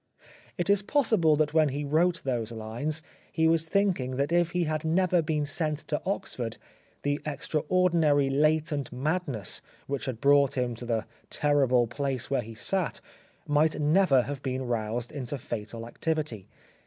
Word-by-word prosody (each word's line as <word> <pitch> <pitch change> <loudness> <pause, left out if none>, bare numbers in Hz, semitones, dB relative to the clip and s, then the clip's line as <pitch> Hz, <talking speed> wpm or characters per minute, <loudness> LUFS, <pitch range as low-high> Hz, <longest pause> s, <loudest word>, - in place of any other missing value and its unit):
It 175 - -1
is 200 0 +4
possible 210 - +3
that 150 0 +1
when 155 -2 +4
he 140 +2 -3
wrote 165 +4 +1
those 120 -4 -2
lines 120 +8 -3 0.3
he 160 0 +2
was 165 0 +2
thinking 180 -11 +1
that 140 +4 -1
if 175 -1 +3
he 180 0 0
had 155 -1 -2
never 175 +2 +2
been 150 -1 -1
sent 150 +1 0
to 150 - 0
Oxford, 120 - -3 0.5
the 145 +1 0
extraordinary 155 -1 +2
latent 150 0 +1
madness 135 - -2 0.2
which 140 -1 -3
had 125 -4 -3
brought 140 0 +4
him 125 -1 0
to 120 - -7
the 115 -2 -1 0.2
terrible 135 -5 +3
place 130 +2 -3
where 135 - +2
he 115 0 -10
sat, 165 - 0 0.5
might 150 +2 +2
never 150 -3 +4
have 140 0 -5
been 130 0 -3
roused 120 0 -2
into 140 -1 -4
fatal 115 -1 -6
activity. 145 - -3
145 Hz, 155 wpm, -28 LUFS, 125-160 Hz, 0.5 s, is